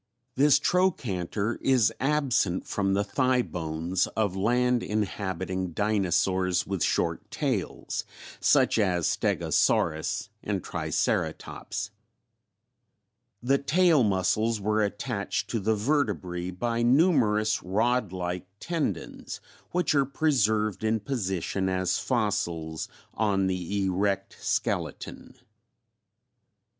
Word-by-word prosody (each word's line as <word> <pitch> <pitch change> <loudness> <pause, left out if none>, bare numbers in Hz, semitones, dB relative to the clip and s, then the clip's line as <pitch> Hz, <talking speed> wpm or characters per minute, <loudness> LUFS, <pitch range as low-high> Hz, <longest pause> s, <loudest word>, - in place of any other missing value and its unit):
This 140 +1 +5
trochanter 115 - 0
is 130 -6 +3
absent 135 -10 +1
from 95 -1 0
the 100 - +2
thigh 125 +4 +1
bones 85 +1 -2
of 105 -4 +1
land 120 +4 +2
inhabiting 95 -3 -2
dinosaurs 95 -2 +1
with 95 -3 -3
short - - 0
tails, - - -2 0.4
such - - +3
as 90 -5 +1
Stegosaurus - - +1
and - - -2
Triceratops. 100 -1 -2 1.5
The 135 +2 +3
tail 165 +1 +4
muscles 105 +2 +1
were 105 +2 +1
attached 100 - -2
to 115 - 0
the 110 +2 +1
vertebrae 100 - -1
by 115 +6 -2
numerous 120 - +3
rod 110 +2 +1
like 90 -1 -4
tendons 150 - -3 0.3
which 180 -2 +1
are 140 -2 +3
preserved 110 - +1
in 110 0 +1
position 95 -5 -2
as 95 -1 0
fossils 85 -9 -1 0.2
on 100 -3 +1
the 95 +2 -1
erect 95 +1 -1
skeleton. - - -3
105 Hz, 100 wpm, -27 LUFS, 95-125 Hz, 1.5 s, This